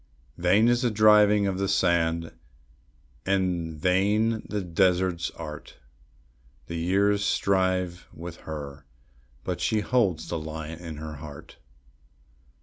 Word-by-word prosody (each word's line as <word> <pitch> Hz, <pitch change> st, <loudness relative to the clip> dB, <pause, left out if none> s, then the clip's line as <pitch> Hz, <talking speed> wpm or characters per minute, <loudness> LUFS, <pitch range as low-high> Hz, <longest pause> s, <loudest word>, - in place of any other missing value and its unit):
Vain 95 Hz, +6 st, +4 dB
is 120 Hz, 0 st, +3 dB
the 125 Hz, -, +2 dB
driving 105 Hz, -1 st, +5 dB
of 95 Hz, -1 st, -1 dB
the 100 Hz, -, 0 dB
sand, 85 Hz, -3 st, +1 dB, 0.9 s
and 90 Hz, -5 st, -1 dB
vain 105 Hz, +6 st, +2 dB
the 105 Hz, -2 st, -2 dB
desert's 90 Hz, -1 st, +1 dB
art; 75 Hz, -2 st, -8 dB, 0.9 s
The 85 Hz, -, -6 dB
years 100 Hz, +4 st, +2 dB
strive 95 Hz, -3 st, 0 dB
with 85 Hz, +1 st, -9 dB
her, 70 Hz, -2 st, -8 dB, 0.6 s
but -, -, -4 dB
she 110 Hz, -1 st, +1 dB
holds 100 Hz, -9 st, +1 dB
the 85 Hz, -, -3 dB
lion 80 Hz, +1 st, -7 dB
in 85 Hz, -3 st, -7 dB
her 75 Hz, 0 st, -7 dB
heart. 75 Hz, 0 st, -11 dB
90 Hz, 120 wpm, -26 LUFS, 80-100 Hz, 0.9 s, driving